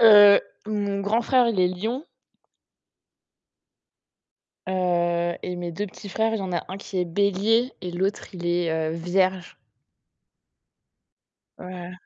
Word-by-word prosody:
heu, 205 -2 +9 0.3
mon 205 -2 -2
grand 215 +4 +1
frère, 250 -1 +3
il 210 -5 -1
est 180 - +4
lion 220 - -3 2.6
heu 175 -2 0
et 180 - -3
mes 175 -1 -5
2 205 +5 -3
petits 200 +1 -11
frères, 225 +3 0
il 220 - -1
y - - -4
en 185 -1 -4
a 175 - -1
un 190 - -5
qui 195 -1 -7
est 180 - +1
bélier 200 +7 +1
et 180 -1 -5
l'autre, 190 +3 -2
il 175 -1 -7
est, 175 -1 +1
heu, 160 0 -1
vierge. 185 +2 0 2.0
Oh - - -11
là 180 -1 -7
là! - - -9
185 Hz, 150 wpm, -24 LUFS, 175-205 Hz, 2.6 s, heu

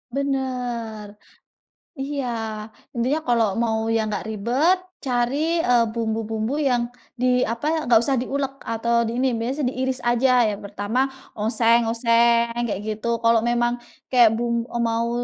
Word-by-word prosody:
Benar, 245 -6 -3 0.8
iya 275 0 -3 0.7
intinya 255 +6 +1
kalau 230 -4 +2
mau 225 0 0
yang 225 -1 0
enggak 210 - -3
ribet 240 - +1 0.3
cari, 275 +7 +1
eee, 245 -6 +3
bumbu-bumbu 225 +2 -2
yang 250 -5 +1 0.3
di 250 0 +3
apa, 305 +8 -1
enggak 230 -2 +5
usah 265 +2 +1
diulek 275 +2 -2
atau 235 +1 +1
di 235 +2 -2
ini, 265 - +3
biasanya 250 +4 -1
diiris 260 0 -2
aja 240 -1 +3
yang 205 -1 -4
pertama 205 +6 -1 0.3
oseng 230 +2 +3
oseng 235 +1 +2
kayak 205 -4 -3
gitu 220 +2 -2
kalau 230 0 +5
memang, 240 0 +1 0.3
kayak 240 -4 +5
bum 235 0 -1
e 240 - -6
mau, 230 0 0
235 Hz, 140 wpm, -23 LUFS, 225-255 Hz, 0.8 s, enggak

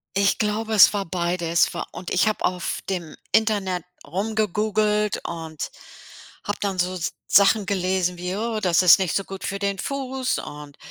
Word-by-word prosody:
Ich 200 0 +2
glaube, 220 +1 -1
es 205 - +8
war 200 -1 -1
beides 170 -1 0
wa 175 - -4
und 180 - -7
ich 185 - +3
habe 215 - -1
auf 180 -1 -1
dem 175 -5 -4 0.2
Internet 200 -5 +1 0.2
rumgegoogelt 210 +2 0
und 160 -2 -5 0.7
habe 205 - -3
dann 195 -3 -2
so 185 +1 0 0.3
Sachen 200 +1 +5
gelesen 185 -2 0
wie: 180 +2 -4
„Oh, 225 0 -2
das 180 -3 +3
ist 180 -3 +8
nicht 190 -3 -1
so 195 - +1
gut 195 0 -9
für 200 0 -3
den 200 -1 -1
Fuß 265 0 -2
und, 145 -1 -9
195 Hz, 165 wpm, -23 LUFS, 180-210 Hz, 0.7 s, es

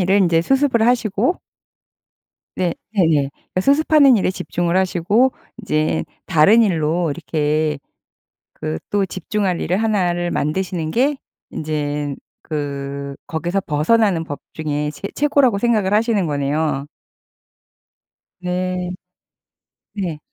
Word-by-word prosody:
일은 190 +1 +3
인제 165 -1 +3
수습을 265 0 +2
하시고 240 - +1 1.2
네. 175 -2 0 0.2
네네. 155 -8 +2 0.2
그 185 - +2
수습하는 285 - +5
일에 190 - +1
집중을 175 -1 -2
하시고 190 +7 +2 0.3
이제 155 -5 0 0.2
다른 200 +9 +5
일로 165 -3 +1
이렇게 155 -1 -1 0.8
그 80 +1 -4
또 200 -1 +1
집중할 185 0 -2
일을 180 - 0
1 205 -5 +1
를 175 0 -2
만드시는 160 +1 -2
게 275 - +2 0.4
인제 150 -2 -2 0.3
그 140 -2 -4
거기서 175 +4 -1
벗어나는 175 +3 +2
법 145 -2 -6
중에 150 -1 -2
최 195 - -6
최고라고 275 -7 +3
생각을 210 -4 +1
하시는 215 -3 +2
거네요. 145 0 -1 1.5
네 180 0 -2 1.0
네. 180 -7 -3
180 Hz, 225 characters per minute, -20 LUFS, 155-210 Hz, 1.5 s, 수습하는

